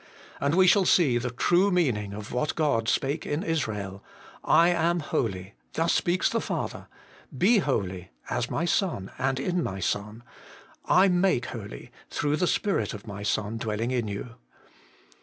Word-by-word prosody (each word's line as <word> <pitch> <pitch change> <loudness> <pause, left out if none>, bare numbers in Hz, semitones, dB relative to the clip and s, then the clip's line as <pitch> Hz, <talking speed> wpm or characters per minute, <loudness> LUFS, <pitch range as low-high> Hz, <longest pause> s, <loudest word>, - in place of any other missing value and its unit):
And 140 +3 +1
we 185 0 +6
shall 190 +1 +5
see 140 -11 +4
the 125 +1 -3
true 175 +10 +2
meaning 125 - +1
of 105 +1 -8
what 125 +5 -1
God 130 -8 +1
spake 145 +3 0
in 150 +2 -2
Israel: 105 - -3 0.2
' - - -19
/ - - -24 0.3
am 170 0 +1
holy' 95 -8 -2 0.2
thus 165 +1 +1
speaks 175 +1 +1
the - - 0
Father; - - -4 0.3
' - - -16
Be 225 +1 +6
holy, 95 - -2
' - - -17
as - - -1
my 170 - -1
Son 170 - -1
and 130 0 0
in 175 +5 0
my 95 -9 -3
Son; 105 +5 -3 0.2
' - - -20 0.2
/ 190 +2 +6
make 185 -11 +2
holy, 100 - -8
' - - -28
through 150 0 0
the 180 - +1
Spirit 200 - 0
of 105 - -10
my 100 -2 -7
Son 105 +2 -1
dwelling 110 +2 -2
in 120 -4 -1
you. 105 +4 -6
125 Hz, 180 wpm, -27 LUFS, 105-170 Hz, 0.3 s, we